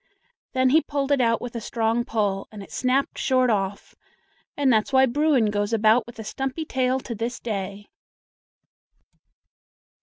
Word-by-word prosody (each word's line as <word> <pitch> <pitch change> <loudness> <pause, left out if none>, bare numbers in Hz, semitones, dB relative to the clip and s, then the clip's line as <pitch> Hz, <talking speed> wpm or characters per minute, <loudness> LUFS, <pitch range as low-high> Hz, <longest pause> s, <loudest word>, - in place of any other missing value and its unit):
Then 260 -1 +3
he 315 +3 +5
pulled 285 -2 -2
it 280 -2 +3
out 230 -1 +2
with 245 0 -7
a 230 - -3
strong 225 +1 0
pull, 205 -5 -1
and 210 -2 -9
it - - -15
snapped 260 +2 0
short 255 -2 +2
off, 200 -1 -2 0.6
and 275 -3 +3
that's 215 +2 +1
why 265 0 +5
Bruin 265 -4 +2
goes 205 +1 -1
about 220 +1 +3
with 240 - -12
a 220 - -6
stumpy 270 +7 -4
tail 260 -2 0
to 240 - -6
this 230 +3 -4
day! 200 -2 -5
240 Hz, 160 wpm, -24 LUFS, 215-265 Hz, 0.6 s, he